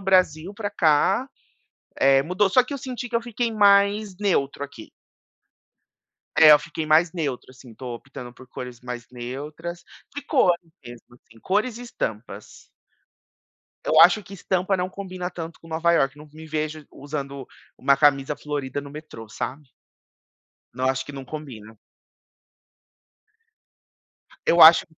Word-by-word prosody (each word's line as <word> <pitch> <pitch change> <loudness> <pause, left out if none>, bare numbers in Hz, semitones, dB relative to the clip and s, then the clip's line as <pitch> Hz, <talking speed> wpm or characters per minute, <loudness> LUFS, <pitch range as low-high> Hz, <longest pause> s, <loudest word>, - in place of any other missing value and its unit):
Brasil 185 -2 +2
pra 205 -1 -4
cá, 190 - +2 0.7
eh, 135 0 +4
mudou. 185 +5 +1
Só 250 +5 +5
que 285 - -6
eu - - -5
senti 250 -1 -6
que 240 - -11
eu 235 - +2
fiquei 235 0 -2
mais 200 -1 +3
neutro 145 -9 0
aqui. 125 -6 -11 1.5
É, 155 -1 +8
eu 150 - +8
fiquei 155 +2 -6
mais 160 +2 +4
neutro, 145 -8 -4
assim, 130 -2 -15
tô 125 +1 -7
optando 125 0 -10
por 130 +1 -15
cores 125 -2 -8
mais 125 -1 -7
neutras 150 +8 -7 0.3
de 290 - -5
cor 260 - +3 0.3
mesmo 120 0 -13
assim, 115 -2 -21
cores 215 - -1
e - - -8
estampas. 110 - -6 1.2
Eu 155 - +4
acho 175 +5 +7
que 195 - -15
estampa 190 0 0
não 180 0 -2
combina 185 -2 -6
tanto 165 -2 -8
com 165 - -15
Nova 165 +1 +1
Iorque, 135 -4 +2
não 150 +1 -13
me 160 +1 -11
vejo 155 -1 -4
usando 140 -2 -6 0.3
uma 140 - +3
camisa 140 0 +3
florida 145 -2 -4
no 140 0 -11
metrô, 145 -7 -10
sabe. 135 +6 -6 1.1
Não, 130 +1 -2
acho 130 0 -1
que 145 - -9
não 135 -1 -8
combina. 125 -7 -9 2.7
Eu 170 - +4
acho 160 +1 +9
155 Hz, 145 wpm, -24 LUFS, 135-185 Hz, 2.7 s, acho